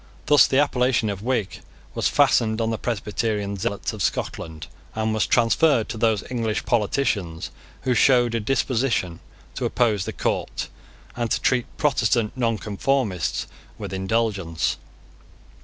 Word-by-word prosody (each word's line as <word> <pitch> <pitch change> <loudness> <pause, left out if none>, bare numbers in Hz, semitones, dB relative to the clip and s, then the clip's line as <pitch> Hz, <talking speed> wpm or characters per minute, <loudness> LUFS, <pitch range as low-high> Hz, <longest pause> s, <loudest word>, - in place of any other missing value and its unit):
Thus 145 0 +6
the 135 - +1
appellation 125 -6 +2
of 100 -1 -6
Whig 115 -4 -1 0.3
was - - +1
fastened 110 -1 +3
on 115 0 0
the 115 - -3
Presbyterian 105 -2 -2
zealots 100 +3 -2
of 110 - -7
Scotland, 80 -2 -3 0.3
and 110 0 0
was 110 - +1
transferred 120 +1 +3
to 115 - -4
those 110 -3 +2
English 115 -3 -1
politicians 105 -7 0 0.3
who 130 - +2
showed 120 -1 +4
a 115 - +1
disposition 115 -6 0 0.3
to - - -3
oppose 110 -6 +1
the - - -3
court, - - -2 0.5
and 120 -1 -2
to - - +1
treat 125 -2 +1
Protestant 120 -6 +1
Nonconformists 110 - -1 0.3
with - - -6
indulgence. 95 -4 -1
110 Hz, 135 wpm, -23 LUFS, 100-125 Hz, 0.5 s, Thus